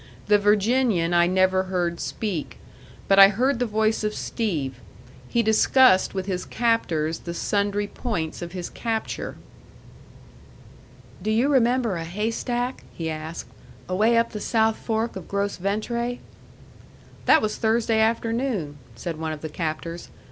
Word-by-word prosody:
The 210 Hz, 0 st, +4 dB
Virginian 205 Hz, -3 st, +2 dB
I 175 Hz, 0 st, +4 dB
never 185 Hz, +1 st, +2 dB
heard 175 Hz, -2 st, -1 dB
speak. 195 Hz, -9 st, -4 dB, 0.5 s
But 195 Hz, 0 st, +5 dB
I 195 Hz, -, +11 dB
heard 240 Hz, +6 st, +1 dB
the 245 Hz, -, 0 dB
voice 220 Hz, 0 st, +1 dB
of 210 Hz, 0 st, -1 dB
Steve; 150 Hz, -, -3 dB, 0.5 s
he 235 Hz, -, +2 dB
discussed 220 Hz, -1 st, +4 dB
with 190 Hz, -1 st, -2 dB
his 185 Hz, -2 st, -2 dB
captors 165 Hz, -10 st, 0 dB
the 170 Hz, 0 st, -6 dB
sundry 205 Hz, +2 st, 0 dB
points 190 Hz, -8 st, -4 dB
of 175 Hz, -1 st, -6 dB
his 180 Hz, -2 st, -5 dB
capture. 225 Hz, -2 st, -3 dB, 1.8 s
"Do 210 Hz, -, -2 dB
you 230 Hz, +6 st, +2 dB
remember 245 Hz, -6 st, +2 dB
a 165 Hz, -, -4 dB
haystack?" 230 Hz, +7 st, -2 dB
he 160 Hz, -1 st, -4 dB
asked. 155 Hz, +1 st, -6 dB, 0.4 s
"Away 215 Hz, +6 st, +2 dB
up 230 Hz, 0 st, +2 dB
the 210 Hz, -, -5 dB
south 220 Hz, 0 st, +1 dB
fork 225 Hz, 0 st, -2 dB
of 190 Hz, -3 st, -8 dB
Gros 200 Hz, 0 st, -2 dB
Ventre?" 235 Hz, +6 st, -2 dB, 1.1 s
"That 315 Hz, -, +6 dB
was 215 Hz, 0 st, -1 dB
Thursday 225 Hz, 0 st, +1 dB
afternoon," 225 Hz, -, 0 dB, 0.2 s
said 155 Hz, +6 st, -5 dB
one 160 Hz, -1 st, -2 dB
of 150 Hz, -, -8 dB
the 155 Hz, -, -5 dB
captors. 165 Hz, +2 st, -4 dB
205 Hz, 140 wpm, -24 LUFS, 175-230 Hz, 1.8 s, I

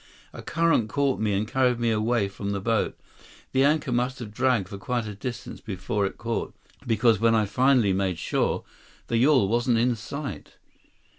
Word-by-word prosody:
A -, -, -8 dB
current 165 Hz, -9 st, +1 dB
caught 140 Hz, +1 st, 0 dB
me 110 Hz, -1 st, 0 dB
and 100 Hz, +2 st, 0 dB
carried 125 Hz, 0 st, +1 dB
me 120 Hz, -1 st, +1 dB
away 110 Hz, -1 st, +1 dB
from 100 Hz, +1 st, -5 dB
the 100 Hz, -, -2 dB
boat. 115 Hz, +2 st, 0 dB, 0.5 s
The 135 Hz, 0 st, +3 dB
anchor 145 Hz, -2 st, +2 dB
must 125 Hz, +2 st, 0 dB
have 110 Hz, -4 st, -8 dB
dragged 125 Hz, -6 st, +1 dB
for 100 Hz, -2 st, -7 dB
quite 120 Hz, +2 st, -2 dB
a 105 Hz, -, -5 dB
distance 120 Hz, +4 st, -7 dB
before 100 Hz, 0 st, -2 dB
it -, -, -9 dB
caught, 115 Hz, +1 st, -3 dB, 0.3 s
because 115 Hz, -1 st, +3 dB
when 115 Hz, 0 st, +3 dB
I 110 Hz, -1 st, +3 dB
finally 125 Hz, -1 st, +3 dB
made 95 Hz, -2 st, 0 dB
shore, -, -, -1 dB, 0.5 s
the 115 Hz, -, +1 dB
yawl 130 Hz, -3 st, +4 dB
wasn't 120 Hz, +2 st, +2 dB
in 120 Hz, +1 st, +2 dB
sight." 140 Hz, +7 st, -7 dB
115 Hz, 180 wpm, -26 LUFS, 105-125 Hz, 0.5 s, yawl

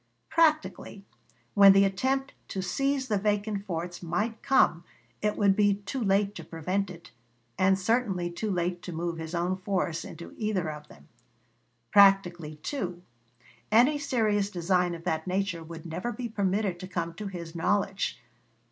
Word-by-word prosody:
Practically, 310 Hz, -10 st, +1 dB, 0.5 s
when 200 Hz, -1 st, +8 dB
the 195 Hz, 0 st, +6 dB
attempt 265 Hz, +8 st, 0 dB
to 190 Hz, -, -4 dB
seize 275 Hz, +7 st, 0 dB
the 210 Hz, -4 st, +1 dB
vacant 205 Hz, 0 st, -1 dB
forts 175 Hz, 0 st, -4 dB
might 210 Hz, +7 st, -2 dB
come 175 Hz, -10 st, +3 dB, 0.4 s
it 210 Hz, 0 st, 0 dB
would 200 Hz, -2 st, +4 dB
be 205 Hz, -1 st, +3 dB
too 205 Hz, +6 st, -4 dB
late 200 Hz, 0 st, +2 dB
to -, -, -8 dB
prevent 185 Hz, +4 st, -2 dB
it, 170 Hz, -4 st, -11 dB, 0.4 s
and 190 Hz, +4 st, +3 dB
certainly 195 Hz, -3 st, 0 dB
too 210 Hz, +5 st, -3 dB
late 175 Hz, -1 st, -1 dB
to 180 Hz, -, -7 dB
move 170 Hz, 0 st, -3 dB
his 160 Hz, +2 st, -5 dB
own 175 Hz, +2 st, 0 dB
force 185 Hz, -3 st, -2 dB
into 170 Hz, +1 st, -10 dB
either 200 Hz, -7 st, -1 dB
of 150 Hz, 0 st, -10 dB
them. 70 Hz, -, -17 dB, 0.8 s
Practically, 180 Hz, -6 st, +4 dB
too, 180 Hz, -11 st, -4 dB, 0.7 s
any 255 Hz, +7 st, +5 dB
serious 215 Hz, -7 st, +1 dB
design 180 Hz, -1 st, +1 dB
of 165 Hz, -, -10 dB
that 160 Hz, -1 st, -2 dB
nature 185 Hz, -2 st, -1 dB
would 165 Hz, 0 st, -10 dB
never 180 Hz, +8 st, -3 dB
be 245 Hz, 0 st, -4 dB
permitted 200 Hz, -3 st, -1 dB
to 185 Hz, -, -7 dB
come 170 Hz, -2 st, -3 dB
to 205 Hz, +5 st, -6 dB
his 170 Hz, -4 st, -7 dB
knowledge. 195 Hz, -2 st, 0 dB
195 Hz, 155 wpm, -28 LUFS, 175-210 Hz, 0.8 s, when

